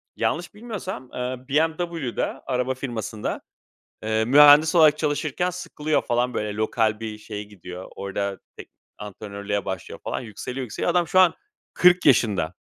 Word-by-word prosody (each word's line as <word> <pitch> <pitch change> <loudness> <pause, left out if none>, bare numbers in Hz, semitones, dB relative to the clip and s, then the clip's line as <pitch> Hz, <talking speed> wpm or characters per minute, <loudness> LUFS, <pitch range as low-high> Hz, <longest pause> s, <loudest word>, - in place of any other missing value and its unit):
yanlış 170 +1 -2
bilmiyorsam, 205 - -7
eee, 125 +1 -3
BMW'de, 160 -2 0 0.2
araba 125 0 -1
firmasında, 120 -5 -4 0.6
eee, 110 0 +1
mühendis 145 +5 +7
olarak 155 -3 +6
çalışırken 155 +3 -1
sıkılıyor, 155 -4 -2
falan, 120 +1 0
böyle 105 -1 -2
lokal 110 0 0
bir 110 -1 -5
şeye 105 -1 -7
gidiyor. 90 -3 -10
Orada 100 0 -3 0.2
tek - - -10 0.3
antrenörlüğe 100 0 -5
başlıyor 95 -2 -6
falan. - - -3
Yükseliyor, 120 +4 -6
yükseliyor. 115 - -2
Adam 175 -2 +1
şu 185 - +2
an 180 -3 +5 0.4
40 180 0 +5
yaşında. 100 - +3
125 Hz, 135 wpm, -24 LUFS, 105-155 Hz, 0.6 s, mühendis